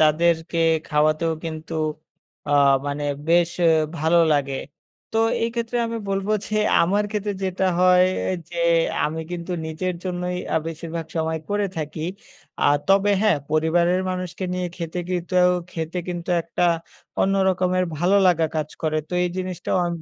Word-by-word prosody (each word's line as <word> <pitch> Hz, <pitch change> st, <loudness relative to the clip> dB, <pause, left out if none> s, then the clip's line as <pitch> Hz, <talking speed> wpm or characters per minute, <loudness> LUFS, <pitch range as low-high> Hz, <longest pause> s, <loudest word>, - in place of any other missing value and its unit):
তাদেরকে 165 Hz, +2 st, +2 dB, 0.3 s
খাওয়াতেও 155 Hz, +2 st, +2 dB
কিন্তু 160 Hz, 0 st, -6 dB, 0.7 s
আ -, -, +1 dB, 0.3 s
মানে 145 Hz, +1 st, -2 dB, 0.2 s
বেশ 170 Hz, 0 st, +4 dB
অ্যা 170 Hz, -, +5 dB, 0.3 s
ভালো 160 Hz, +3 st, +3 dB
লাগে। 140 Hz, -2 st, 0 dB, 0.6 s
তো 225 Hz, -, +1 dB, 0.2 s
এই 230 Hz, -, +2 dB
ক্ষেত্রে 235 Hz, +1 st, -2 dB
আমি 230 Hz, 0 st, -4 dB
বলব 195 Hz, +1 st, -1 dB, 0.2 s
যে 215 Hz, -, -4 dB, 0.3 s
আমার 200 Hz, +4 st, +2 dB
ক্ষেত্রে 210 Hz, -1 st, -2 dB
যেটা 190 Hz, 0 st, -1 dB, 0.2 s
হয় 180 Hz, 0 st, +6 dB, 0.4 s
যে -, -, -8 dB, 0.5 s
আমি 160 Hz, +2 st, -2 dB
কিন্তু 175 Hz, +1 st, -4 dB
নিজের 175 Hz, +3 st, -3 dB
জন্যই 180 Hz, 0 st, -2 dB, 0.2 s
আ -, -, +3 dB
বেশিরভাগ 165 Hz, 0 st, -5 dB
সময় 160 Hz, 0 st, 0 dB
করে 205 Hz, 0 st, +1 dB
থাকি। 155 Hz, 0 st, -4 dB, 0.6 s
আ -, -, +2 dB, 0.2 s
তবে 195 Hz, +1 st, +4 dB
হ্যাঁ, 210 Hz, -8 st, +4 dB
পরিবারের 170 Hz, +3 st, +2 dB
মানুষকে 185 Hz, 0 st, -4 dB
নিয়ে 180 Hz, 0 st, -1 dB
খেতে 170 Hz, 0 st, -4 dB
কিন্তু 180 Hz, 0 st, +2 dB, 0.2 s
খেতে 165 Hz, +2 st, -3 dB
কিন্তু 175 Hz, 0 st, -4 dB
একটা 170 Hz, +2 st, -3 dB, 0.6 s
অন্য 195 Hz, +1 st, +2 dB
রকমের 185 Hz, 0 st, +1 dB
ভালো 180 Hz, +5 st, +3 dB
লাগা 165 Hz, -3 st, +3 dB
কাজ 155 Hz, -1 st, -1 dB
করে। 155 Hz, -1 st, 0 dB
তো -, -, -12 dB
এই -, -, +1 dB
জিনিসটাও 185 Hz, 0 st, -2 dB
আমি 170 Hz, -1 st, -4 dB
175 Hz, 150 wpm, -23 LUFS, 160-185 Hz, 0.7 s, হয়